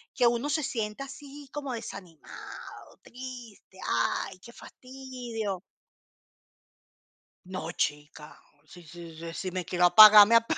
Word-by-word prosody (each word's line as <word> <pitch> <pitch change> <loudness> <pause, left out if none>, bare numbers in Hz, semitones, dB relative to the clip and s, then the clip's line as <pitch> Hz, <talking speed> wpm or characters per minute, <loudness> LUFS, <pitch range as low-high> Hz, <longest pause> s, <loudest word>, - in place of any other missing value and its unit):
que 245 -3 +3
uno 240 +5 0
se 310 0 0
sienta 225 +1 -4
así 280 0 -12
como 285 -3 -5
desanimado, 180 -8 -10
triste, 245 -6 -11
ay, 115 +9 -1
qué 235 - -14
fastidio. 245 -7 -7 1.8
No, 180 -3 -6
chica, 150 0 -4 0.3
si 175 - -14
si 165 0 -11
si 165 +1 -8
si 185 +1 -5
me 185 0 -3
quiero 180 0 +1
apagar, 210 +2 +10
me 230 - +4
apa 230 0 +3
215 Hz, 125 wpm, -28 LUFS, 175-255 Hz, 1.8 s, apagar